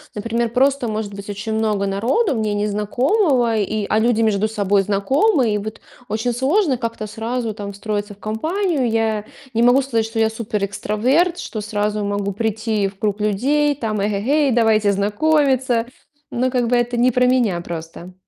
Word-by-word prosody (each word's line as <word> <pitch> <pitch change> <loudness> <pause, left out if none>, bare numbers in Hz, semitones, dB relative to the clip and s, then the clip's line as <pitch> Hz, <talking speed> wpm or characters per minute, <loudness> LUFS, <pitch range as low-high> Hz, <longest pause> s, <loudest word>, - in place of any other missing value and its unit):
например, 230 +2 -1
просто 265 +1 +2
может 215 -2 -3
быть 200 +1 -9
очень 215 +2 -4
много 215 -2 0
народу, 235 - +1
мне 215 -2 -1
незнакомого, 235 - +1
и 210 0 -1
а 215 - +2
люди 230 0 +2
между 215 -1 +2
собой 205 -2 +1
знакомы. 235 - +2
И - - +1
вот 215 +2 -7 0.3
очень 225 +3 -1
сложно 275 - +1
как-то 230 -2 -4
сразу 225 +1 -3
там 200 -1 -6
встроиться 205 +1 -4
в - - -31
компанию. 300 - -1
Я 220 -2 0 0.3
не 230 - +1
могу 245 +3 +5
сказать, 230 -4 0
что 225 0 -7
я 220 0 +3
суперэкстраверт, 220 - 0
что 215 - -5
сразу 210 0 -2
могу 200 0 -2
прийти 220 0 -1
в 195 0 -10
круг 210 -1 -1
людей, 285 +8 +1
там: 220 -6 -2
"Эге-гей, 230 +9 +1
давайте 220 -3 +3
знакомиться!" 255 +3 +1 0.5
Ну, 255 +2 0
как 245 -2 +1
бы 245 - +2
это 240 0 0
не 245 +2 +4
про 250 +1 +2
меня 235 -9 +2
просто. 170 +1 -8
220 Hz, 165 wpm, -20 LUFS, 205-250 Hz, 0.5 s, могу